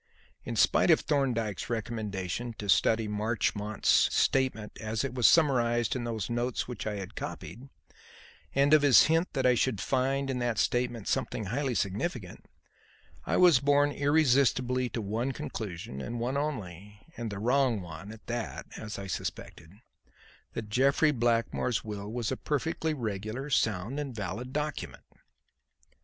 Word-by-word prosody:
In - - -4
spite - - +4
of - - +6
Thorndyke's 120 -8 -1
recommendation 110 -1 -3
to 105 - -6
study 110 +3 +3
Marchmont's 105 -1 -2 0.2
statement 130 -5 +1
as 110 +1 -2
it 135 - -3
was 125 -3 +4
summarized 120 -7 +3
in 120 -2 -3
those 110 -4 -3
notes 120 +1 -2
which 120 -3 -5
I 105 - -2
had 100 -2 -6
copied, 120 - -7 0.9
and 140 +2 +4
of 155 - +7
his 145 -3 +7
hint 165 +3 +1
that 135 -2 0
I 125 - +6
should 120 -3 0
find 135 +3 0
in 125 - -2
that 120 -3 -1
statement 120 -3 0
something 110 - -1
highly 130 +5 -1
significant, 105 - -3 0.8
I - - +1
was 175 -7 +6
borne 145 +1 +3
irresistibly 130 -4 +2
to 115 - -4
one 115 +6 -2
conclusion, 90 - -6
and 120 +8 -5
one 125 +3 -1
only 105 - -5
and 120 -1 -4
the 100 - -5
wrong 125 +1 +2
one 90 +4 -9
at 110 0 -13
that, 120 -1 -4
as 110 -1 -6
I 100 - -6
suspected: 85 -3 -6 0.8
that 105 - -5
Jeffrey 140 +7 +3
Blackmore's 120 -1 0
will 105 -1 -6
was 120 -1 -2
a - - -2
perfectly 155 +2 -1
regular, 110 +3 -4
sound 110 +2 0
and 140 -5 -5
valid 105 +5 -5
document. 150 +1 -4
120 Hz, 150 wpm, -29 LUFS, 105-135 Hz, 0.9 s, of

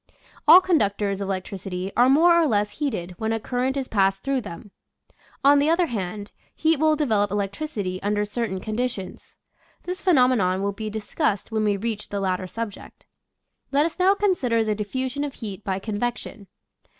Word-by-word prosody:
All 345 +5 +10
conductors 200 - 0
of 195 - -3
electricity 190 0 -4
are 245 +2 +5
more 330 +6 +6
or 335 -2 +4
less 210 -2 -1
heated 215 - -2
when 220 0 -1
a 225 - 0
current 255 +4 -2
is 265 -2 -2
passed 195 -2 +1
through 275 -1 0
them. 200 0 -10 0.7
On 285 +1 +6
the 290 +2 +2
other 340 +2 +3
hand, 205 - -5 0.2
heat 320 -2 +2
will 310 0 +4
develop 220 -9 +1
electricity 200 -1 -3
under 205 +1 0
certain 210 -2 -3
condi 225 +5 -1
tions. 195 -6 -9 0.5
This 365 +2 -5
phenomenon 250 - +3
will 200 0 -1
be 215 +2 -5
discussed 210 -1 -2
when 220 -1 0
we 205 -1 +1
reach 215 0 -4
the 200 - -3
latter 185 -1 -1
subject. 225 +1 -7 0.7
Let 285 +2 +3
us 335 +2 -4
now 380 +2 +4
consider 280 - +1
the 215 -1 0
diffusion 260 +7 -3
of 285 -2 -5
heat 205 -3 -7
by 190 -2 -2
convection. 215 0 -4
220 Hz, 175 wpm, -24 LUFS, 200-275 Hz, 0.7 s, All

